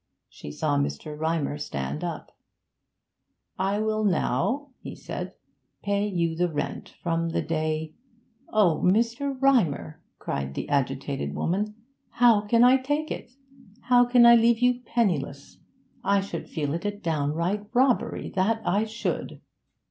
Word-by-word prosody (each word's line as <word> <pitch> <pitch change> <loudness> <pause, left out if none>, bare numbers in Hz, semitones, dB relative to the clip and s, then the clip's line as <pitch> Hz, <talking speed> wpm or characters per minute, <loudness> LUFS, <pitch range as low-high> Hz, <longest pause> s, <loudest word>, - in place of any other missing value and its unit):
She 75 - -10
saw 70 -1 0
Mr. 70 - -3
Rymer 155 -2 -1
stand 70 - -4
up. - - -6 1.2
'I 195 +2 0
will 215 0 0
now,' 205 - 0
he - - -8
said, - - -6 0.5
'pay 200 +1 0
you 170 -4 -1
the 175 +1 0
rent 145 -1 -4
from 165 -1 0
the 165 - -1
day 155 -1 -2 0.3
' 235 +3 -35
'Oh, 195 -7 +3
Mr. 235 +7 +1
Rymer!' 175 - +1 0.2
cried 70 0 -4
the - - -4
agitated 70 0 -1
woman. 210 +5 -1 0.4
'How 235 -4 +5
can 230 +2 +4
I 255 +2 +7
take 290 +4 -2
it? 245 - -6 0.5
How 245 +1 +5
can 245 0 +5
I 235 - +9
leave 235 0 +5
you 245 +1 +2
penniless? 165 - -2 0.4
I 200 +1 +3
should 195 - -6
feel 145 -3 -2
it 170 - -3
a 205 0 -3
downright 170 +4 -1
robbery, 255 0 +1
that 220 +4 0
I 205 +4 +2
should!' 220 +1 -4
200 Hz, 140 wpm, -26 LUFS, 155-235 Hz, 1.2 s, I